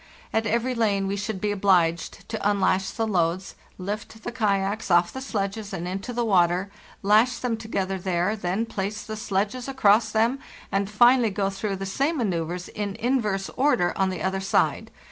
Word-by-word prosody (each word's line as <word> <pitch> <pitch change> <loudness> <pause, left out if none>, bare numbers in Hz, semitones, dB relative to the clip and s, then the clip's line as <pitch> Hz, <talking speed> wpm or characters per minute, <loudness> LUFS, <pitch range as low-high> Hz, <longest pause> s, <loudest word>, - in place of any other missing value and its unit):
At 225 0 +1
every 235 +4 0
lane 205 -5 +1
we 195 +1 -1
should 200 0 -3
be 210 +2 0
obliged 180 -5 +1
to 220 - -3
unlash 195 -1 +1
the 225 - -2
loads, 185 -2 0 0.2
lift 210 +3 -6
the - - -4
kayaks 205 -3 0
off 175 0 +4
the 265 - -5
sledges 205 -3 -3
and 175 -2 -4
into 195 +6 -4
the 240 0 -1
water, 185 -1 +2 0.3
lash 215 +5 +4
them 245 -2 -1
together 195 -4 -3
there, 180 +3 0
then 195 +2 -1
place 210 -1 -4
the 220 - -6
sledges 215 +4 -2
across 220 -4 +3
them, 230 +5 +2 0.3
and 195 0 0
finally 240 +2 +5
go 195 0 -1
through 195 +1 -3
the 195 0 -5
same 275 - 0
manceuvres 180 - -2
in 205 -2 -4
inverse 215 -6 0
order 250 -11 +2
on 195 -1 +1
the 185 -3 -4
other 190 0 0
side. 195 - +1
200 Hz, 180 wpm, -25 LUFS, 190-225 Hz, 0.3 s, finally